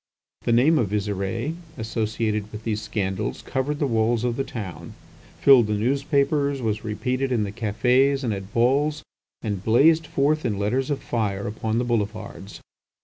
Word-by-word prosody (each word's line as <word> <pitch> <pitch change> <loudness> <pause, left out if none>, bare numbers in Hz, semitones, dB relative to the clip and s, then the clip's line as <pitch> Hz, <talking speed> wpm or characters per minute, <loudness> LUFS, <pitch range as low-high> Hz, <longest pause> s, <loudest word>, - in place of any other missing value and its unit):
The - - +2
name 140 +7 +4
of 110 -6 0
Visire, 105 - -2 0.2
associated 110 -2 -2
with 110 +1 -8
these 110 -2 -2
scandals, 100 -1 -3
covered 140 +3 -2
the 145 - 0
walls 115 -1 +1
of 120 -1 0
the 135 - -1
town, 90 - -7 0.4
filled 130 -5 +6
the 105 - 0
newspapers, 140 +4 +1
was 110 -3 -2
repeated 130 +5 -2
in 115 -4 +1
the 100 - -3
cafés 125 +6 +2
and 115 -4 0
at 95 0 -7
balls, 140 +6 +2 0.4
and 100 -4 -3
blazed 155 +9 +4
forth 150 +3 +1
in 105 -4 -1
letters 125 +7 0
of 145 - -2
fire 100 -4 -2
upon 110 +1 -2
the 120 - +1
boulevards. 110 -3 -3
115 Hz, 160 wpm, -24 LUFS, 105-135 Hz, 0.4 s, filled